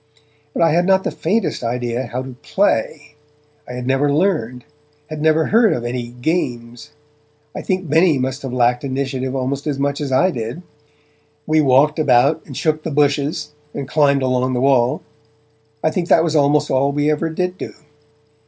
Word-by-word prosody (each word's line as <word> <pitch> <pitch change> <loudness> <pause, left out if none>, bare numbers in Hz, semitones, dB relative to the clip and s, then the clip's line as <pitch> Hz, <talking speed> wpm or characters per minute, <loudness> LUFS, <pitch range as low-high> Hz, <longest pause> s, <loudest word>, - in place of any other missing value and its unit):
But - - +2
I 165 - +4
had 175 +3 +2
not 190 0 +3
the - - -2
faintest 200 - -1
idea 120 +1 -2
how 125 +3 -4
to 130 -1 -9
'play'; 150 - -1 0.6
I - - -6
had 125 0 -5
never 135 +2 +1
learned, 145 - 0 0.5
had 155 -1 -5
never 155 0 +3
heard 225 0 +4
of 120 - -4
any 120 0 -3
'games'. 120 -2 -3 0.6
I - - -5
think 185 -2 -2
Benny 160 +1 +3
must 130 +1 -3
have 135 - -5
lacked 125 0 +1
initiative 130 -1 -3
almost 135 +2 -3
as 145 -2 -1
much 140 +1 -1
as 140 -2 -3
I 180 +9 +3
did. 120 +6 -5 0.8
We 155 0 +3
walked 145 +3 +3
about, 150 +2 +3
and 135 - -8
shook 155 -1 0
the 160 - -4
bushes, 150 +1 0 0.2
and 140 -2 -4
climbed 140 -2 +2
along 130 0 0
the 125 - 0
wall; 130 -3 +2 0.8
I 155 - +2
think 175 -1 -3
that 160 - +5
was 160 -1 -1
almost 145 0 +2
all 135 +2 +2
we 145 +1 +1
ever 160 +2 -1
did 180 +3 -3
do. - - -7
140 Hz, 180 wpm, -19 LUFS, 125-155 Hz, 0.8 s, that